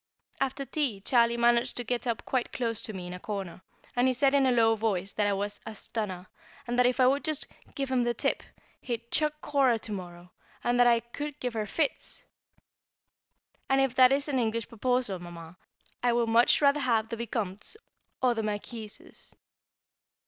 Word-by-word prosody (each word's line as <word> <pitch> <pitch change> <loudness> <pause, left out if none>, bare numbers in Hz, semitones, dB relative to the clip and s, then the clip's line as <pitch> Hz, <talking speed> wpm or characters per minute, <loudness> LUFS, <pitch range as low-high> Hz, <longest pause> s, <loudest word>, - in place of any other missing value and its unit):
After 270 +1 -1
tea 270 -9 -1
Charlie 235 +2 +3
managed 240 +1 +3
to 245 - -2
get 245 +1 -2
up 230 -2 -2
quite 255 -2 -1
close 230 -3 -2
to - - -4
me 185 -3 -6
in 180 - -6
a 180 - -7
corner, 195 -3 -5 0.3
and 245 +1 +3
he 255 - +2
said 270 +2 +3
in 275 -2 +4
a - - +4
low 225 -2 +4
voice 200 -4 -1
that 210 -1 0
I 200 - +2
was 205 +1 -3
"a 220 - -7
stunner," 195 -4 -4 0.4
and 245 +1 -1
that 250 - +6
if 250 +1 0
I 255 - +6
would 275 +3 +3
just 310 -3 -1 0.3
"give 275 -1 -2
him 255 -1 +3
the 240 0 0
tip," - - 0 0.4
he'd 235 -1 -5
"chuck 300 -1 +2
Cora 270 -5 +3
to 220 - -7
morrow;" 180 -2 -7 0.3
that 245 0 +4
I 235 -1 +4
"could 290 +5 -6
give 250 -2 -2
her 215 -2 -2
fits!" 295 +5 -1 1.4
And 270 0 +4
if 270 -2 +2
that 255 0 +6
is 280 +2 +1
an 275 -3 0
English 230 -1 -1
proposal, 235 -4 0
Mamma, 170 -1 -10 0.5
I 245 -1 +3
would 235 -1 +1
much 235 +5 +5
rather 280 +1 +5
have 230 -5 +1
the 230 - -3
Vicomte's 220 - -3 0.5
or 250 -1 +4
the 225 - -2
Marquis's. 215 +1 -7
235 Hz, 190 wpm, -29 LUFS, 210-255 Hz, 1.4 s, that